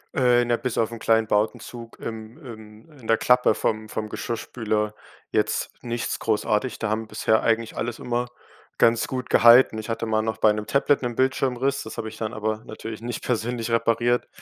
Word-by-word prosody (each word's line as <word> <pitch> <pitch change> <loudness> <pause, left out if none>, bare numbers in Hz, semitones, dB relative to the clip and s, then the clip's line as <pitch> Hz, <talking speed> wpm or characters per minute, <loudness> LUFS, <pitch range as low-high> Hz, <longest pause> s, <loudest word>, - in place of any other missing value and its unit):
Äh, 125 -2 +4
na, 120 0 +1
bis 125 -2 -3
auf 115 0 +1
'n 115 - -7
kleinen 115 0 +3
Bowdenzug 115 +2 -2
im 110 +3 -7
im 110 +2 -12
in 115 - -12
der 115 - +4
Klappe 125 +2 +4
vom 110 0 -2
vom 105 0 -4
Geschirrspüler 110 -2 -2 0.4
jetzt - - 0
nichts 120 -1 -3
großartig. 110 +2 0
Da 110 - -2
haben 110 +1 -2
bisher 110 0 +1
eigentlich 115 0 0
alles 120 +1 -3
immer 120 0 -2 0.5
ganz 115 0 +3
gut 130 -1 -5
gehalten. 120 -1 +7
Ich 110 - -7
hatte 115 0 -2
mal 110 -1 +1
noch 110 -1 -2
bei 110 -1 +4
'nem 105 0 -5
Tablet 140 +2 +2
'n 120 -2 -3
Bildschirmriss, 130 0 +1
das 110 - -8
habe 110 - -4
ich 110 - -12
dann 110 0 -3
aber 110 0 -2
natürlich 110 0 -7
nicht 120 0 -5
persönlich 120 -1 -2
repariert, 120 +1 +1
115 Hz, 185 wpm, -24 LUFS, 110-120 Hz, 0.5 s, gehalten